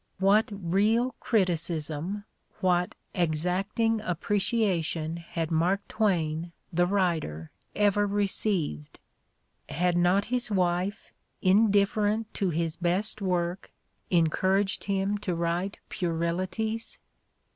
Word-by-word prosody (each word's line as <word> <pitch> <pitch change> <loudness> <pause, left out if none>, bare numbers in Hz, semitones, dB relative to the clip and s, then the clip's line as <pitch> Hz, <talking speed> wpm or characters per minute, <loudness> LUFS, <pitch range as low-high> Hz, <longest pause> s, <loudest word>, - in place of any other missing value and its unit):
What 200 +3 +4
real 205 +6 +1
criticism, 170 -2 0 0.4
what 180 -2 +1 0.2
exacting 185 +7 0
appreciation 180 -4 0
had 170 -1 -4
Mark 180 +5 +1
Twain, 170 -5 0 0.2
the 175 +1 +3
writer, 165 - -1 0.2
ever 205 0 +3
received? 195 - +1 0.7
Had 175 +2 +1
not 180 +3 +3
his 245 -2 +1
wife, 185 0 -1 0.3
indifferent 210 +2 +3
to 195 - 0
his 165 0 -2
best 190 +5 0
work, 180 -1 -1 0.4
encouraged 190 +4 +1
him 200 +1 0
to 190 -4 -2
write 170 +4 -1
puerilities? 185 +6 -2
185 Hz, 90 wpm, -28 LUFS, 170-205 Hz, 0.7 s, What